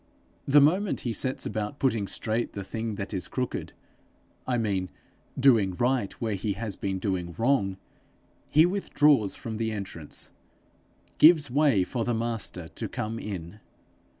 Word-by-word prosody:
The 145 +1 +7
moment 180 +8 +2
he 120 - -2
sets 130 +5 -2
about 105 +5 -3
putting 115 -8 +1
straight 115 +4 -2
the 100 - -5
thing 110 +2 -4
that 100 +2 -5
is 95 - -3
crooked 125 -1 -3 0.7
I 125 -1 +1
mean 100 -5 -1 0.5
doing 115 -9 +4
right 120 -2 +1
where 110 -2 -1
he 100 +1 -2
has 105 -1 -5
been 95 -1 -2
doing 90 -3 -2
wrong, 115 -6 +1 0.7
he 155 +3 +6
withdraws 150 - +2
from 110 -2 -6
the 110 0 -1
entrance, 95 -7 -4 0.9
gives 155 -4 +7
way 140 -8 +4
for 115 +5 -2
the 120 0 0
Master 115 -7 -2
to - - -6
come 110 +1 -4
in. 95 -2 -6
110 Hz, 150 wpm, -27 LUFS, 100-130 Hz, 0.9 s, The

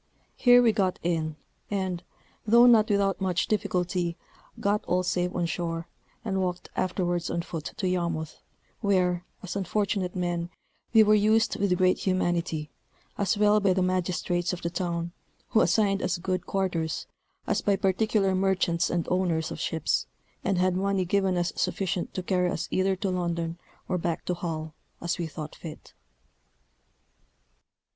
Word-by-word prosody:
Here 245 0 +6
we 230 - +5
got 195 -4 0
in, 160 -2 -1 0.3
and, 190 -3 -2 0.5
though 235 +3 +7
not 230 -3 +6
without 200 -1 +1
much 185 -2 +1
difficulty, 180 -4 0 0.4
got 205 +1 +1
all 180 +1 +1
safe 180 0 -1
on 175 - +1
shore, 165 0 -3 0.4
and 190 -3 0
walked 180 -1 -3
afterwards 175 -2 -1
on 170 - -1
foot 160 -3 -6
to 190 - -1
Yarmouth, 170 -4 -2 0.4
where, 180 -4 +1 0.2
as 190 - -5
unfortunate 195 -1 -1
men, 175 -1 -1 0.4
we 220 -1 +7
were 215 0 +4
used 215 +2 +3
with 195 -3 +2
great 185 0 +3
humanity, 175 -4 -1 0.4
as 200 0 0
well 210 0 +5
by 195 -2 +3
the 185 0 +1
magistrates 180 -1 0
of 175 - -6
the 170 - -1
town, 170 -1 -2 0.4
who 220 - +4
assigned 200 -2 +2
us 185 - 0
good 185 +1 -2
quarters, 175 -5 -1 0.4
as - - 0
by 200 - +2
particular 195 +1 +1
merchants 185 -2 +1
and 170 -2 -1
owners 175 -3 +1
of - - -6
ships, 160 -2 0 0.4
and 195 -1 +1
had 180 0 +2
money 195 0 +1
given 190 0 +1
us 175 0 0
sufficient 185 -2 -1
to 185 - -2
carry 180 -1 +1
us 160 - -3
either 190 0 +2
to 190 0 -2
London 170 -2 -2 0.3
or 180 -1 0
back 165 -1 -2
to 180 - 0
Hull, 160 -3 -4 0.3
as 175 +2 -2
we 170 - -1
thought 155 0 -7
fit.... 160 -3 -10
180 Hz, 155 wpm, -27 LUFS, 170-195 Hz, 0.5 s, though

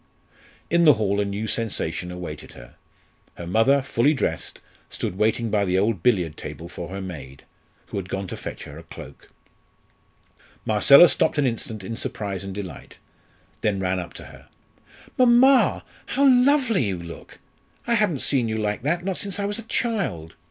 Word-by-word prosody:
In 170 +1 +4
the 150 -3 +8
hall 100 -2 0
a - - 0
new 100 +2 -3
sensation 95 -6 -2
awaited 90 -4 -8
her. - - -14 0.6
Her 85 - -8
mother, 115 +9 +3
fully 140 +3 +2
dressed, - - -3 0.3
stood - - -4
waiting 110 +2 0
by 105 -2 +2
the 95 -1 +1
old 100 -2 +1
billiard 90 -9 +1
table 85 - -8
for 85 0 -8
her 95 +1 -6
maid, 75 -7 -9 0.4
who - - -7
had 95 -2 -5
gone 95 0 -3
to - - -5
fetch - - -7
her 75 +2 -10
a - - -12
cloak. - - -12 1.4
Marcella 140 +10 +7
stopped 145 - +1
an 145 - +2
instant 115 -3 -3
in 115 +4 -5
surprise 100 -4 -4
and 95 -1 -7
delight, 95 -7 -8 0.6
then 105 -2 0
ran 95 0 -1
up 90 - -8
to - - -9
her. - - -15 0.7
"Mamma, 255 +2 +5 0.2
how 280 +1 +2
lovely 255 - +4
you 95 -3 -2
look! 85 -1 -10 0.5
I 235 - +1
haven't 210 - +1
seen 130 -5 +1
you 110 - -2
like 105 -1 -2
that, 170 +7 -1
not 190 -2 -2
since 200 -2 -3
I 200 - -2
was 205 +2 -3
a 230 0 -11
child. 170 - -2
110 Hz, 175 wpm, -23 LUFS, -, 1.4 s, the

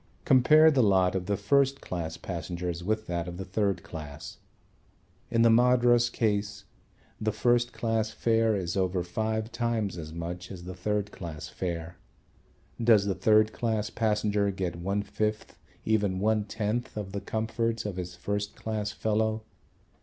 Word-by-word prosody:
Compare 155 +5 +6
the 135 -4 +3
lot 95 -4 +4
of 95 -2 -3
the 100 -1 0
first 135 +6 +2
class 85 -3 -5
passengers 90 -1 -4
with 110 +3 -1
that 85 -2 -3
of 90 0 -6
the 95 - -5
third 95 -1 -1
class. 75 -3 -8 0.9
In 115 -1 +3
the 115 - +6
Madras 120 0 +4
case 105 -2 -1 0.6
the 110 0 +1
first 120 +2 +2
class 115 -2 -1
fare 115 -1 +2
is 90 -3 -2
over 95 -2 0
five 110 +5 -2
times 110 -6 -1
as 80 -1 -7
much 85 +2 -6
as 90 -3 -8
the 90 +1 -6
third 105 +2 -2
class 80 -4 -7
fare. 85 -2 -4 0.9
Does 110 -4 +5
the 100 - +1
third 110 +3 +3
class 110 -3 -1
passenger 105 -2 +1
get 95 -3 -3
one 100 +4 -2
fifth, 110 +1 -3 0.3
even 105 -4 +1
one 105 +1 +1
tenth, 110 +2 -3
of 100 -2 -4
the 100 0 -4
comforts 115 0 -2
of 100 -3 -4
his 90 -1 -5
first 100 +3 -3
class 105 -2 -3
fellow? 110 0 0
105 Hz, 155 wpm, -28 LUFS, 90-110 Hz, 0.9 s, Compare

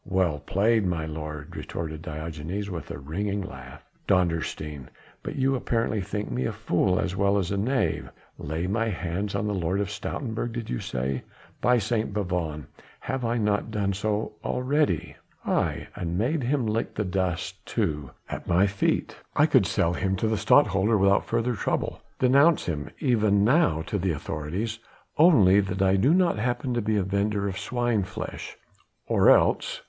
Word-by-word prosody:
"Well 90 -6 0
played, 105 +9 +2
my 85 -4 -1
lord," 75 -1 -6
retorted 80 -2 -5
Diogenes 80 +5 -5
with 85 -2 -6
a - - -5
ringing 100 +8 -3
laugh. 65 -7 -10 0.2
"Dondersteen! 80 -6 0 0.3
but - - -5
you 135 0 +2
apparently 115 -4 0
think 105 0 -4
me 65 +2 -1
a - - 0
fool 90 -1 +1
as 95 - -1
well 100 +1 +2
as 95 -3 -1
a 100 - 0
knave. 125 +7 0 0.3
Lay 80 +4 -3
my 110 +4 0
hands 95 +1 -3
on 100 +1 -1
the 105 - -1
Lord 90 0 0
of 100 -1 -1
Stoutenburg 115 +1 -4
did 115 -2 -5
you - - -1
say? 65 +1 -2 0.4
By 125 0 +4
St. 110 -1 -1
Bavon, 85 -7 -2 0.4
have 135 - -3
I 120 +1 0
not 105 0 0
done 100 -3 0
so 105 +2 -1
already? 125 - 0 0.3
aye! - - 0
and 85 0 -3
made 135 - +1
him 130 0 0
lick 110 +1 -1
the 105 - -1
dust, 90 -2 -2
too, 75 -3 -2 0.2
at - - -6
my 90 +3 +4
feet? 100 0 0 0.2
I - - +5
could - - +4
sell 85 - +1
him 95 +2 0
to 110 - 0
the 110 - +1
Stadtholder 105 -1 +4
without 100 0 +3
further 120 +2 0
trouble 105 - -2 0.2
denounce 140 +6 +4
him 75 -4 -3
even 105 -6 +3
now 110 - +3
to 100 +5 -2
the 95 -1 0
authorities 85 +10 -4 0.4
only 105 - +7
that 95 -1 0
I 95 0 +4
do 110 +10 +4
not 175 - +3
happen 120 +2 -1
to 120 - 0
be 110 0 0
a 100 - +2
vendor 100 +1 0
of 95 -1 -4
swine 120 +1 0
flesh 95 - -6 0.5
or - - +4
else...." - - +3
100 Hz, 175 wpm, -26 LUFS, 85-115 Hz, 0.5 s, only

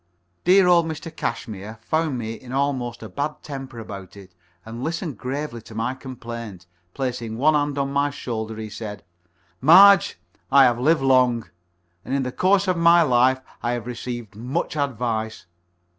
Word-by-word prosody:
Dear 185 +2 +6
old 170 -2 +4
Mr. 160 0 -7
Cashmere 110 -4 -5
found 155 -1 0
me 115 -1 -4
in 125 +2 -11
almost 130 -4 -1
a - - -6
bad 145 +10 -4
temper 135 -4 -7
about 100 -4 -9
it, 95 -2 -14 0.3
and 115 +2 -7
listened 160 -2 -3
gravely 135 -2 -4
to 110 - -13
my 115 +3 -1
complaint. 115 -7 -8 0.3
Placing 120 -4 -3
one 155 +5 +4
hand 145 -1 0
on 140 0 -1
my 140 +1 +2
shoulder, 110 -5 -5
he 110 -1 -5
said: 105 -1 -7 0.6
"Marge, 195 +6 +7 0.3
I 140 -1 +8
have 120 -2 +3
lived 150 +2 +2
long, 125 -3 +3 0.5
and 135 - -3
in 140 - 0
the 125 - -3
course 190 +6 +2
of 180 -2 +1
my 170 0 +6
life 130 -1 +3 0.2
I 120 0 -1
have 120 -2 -4
received 120 -3 -6
much 130 +10 -3
advice. 115 -6 -2
125 Hz, 165 wpm, -23 LUFS, 115-145 Hz, 0.6 s, I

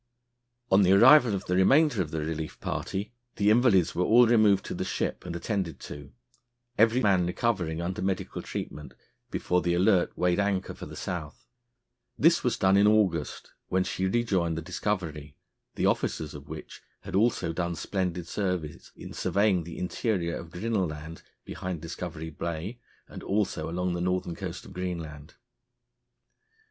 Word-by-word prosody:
On 95 +1 +6
the 95 0 +5
arrival 120 +1 +7
of 95 - -5
the 90 - 0
remainder 135 - +4
of 80 - -3
the 80 0 -3
relief 80 0 -4
party, 105 +4 -4 0.2
the 105 +1 +3
invalids 110 -7 +4
were 90 - 0
all 120 +5 +6
removed 110 -4 +4
to - - -4
the - - -3
ship - - -3
and 85 - -4
attended 95 -2 -3
to, 70 -1 -9 0.6
every 115 +3 +4
man 95 -4 +3
recovering, 90 -5 -1
under 90 +1 -3
medical 95 -1 -2
treatment, 75 - -7 0.3
before 90 0 0
the 85 0 +1
Alert 90 0 +2
weighed 90 +1 +2
anchor 100 -2 0
for - - -9
the - - -10
South. 80 -5 -6 0.7
This 165 +3 +4
was 125 - +1
done 95 +1 +4
in 100 +1 +5
August, 95 -8 +1 0.2
when 95 0 +1
she 95 +1 -2
rejoined 95 -7 0
the 80 - -4
Discovery, 80 -6 -3 0.4
the - - 0
officers 75 -1 0
of 75 -1 -11
which 80 0 -9 0.2
had - - -9
also 95 -5 +1
done 85 0 -2
splendid 90 0 -3
service 90 -7 -3
in - - -9
surveying 100 -4 +1
the 85 - -8
interior 90 -2 -1
of 85 - -7
Grinnel 95 +2 -1
Land, 75 +1 -8 0.2
behind 90 -2 -5
Discovery 80 0 -6
Bay, 85 - -5 0.3
and - - -9
also 95 -6 -1
along 90 +1 -1
the 85 - -3
northern 90 -1 -1
coast 95 -1 -6
of - - -12
Greenland. 85 -5 -6
90 Hz, 160 wpm, -28 LUFS, 85-100 Hz, 0.7 s, arrival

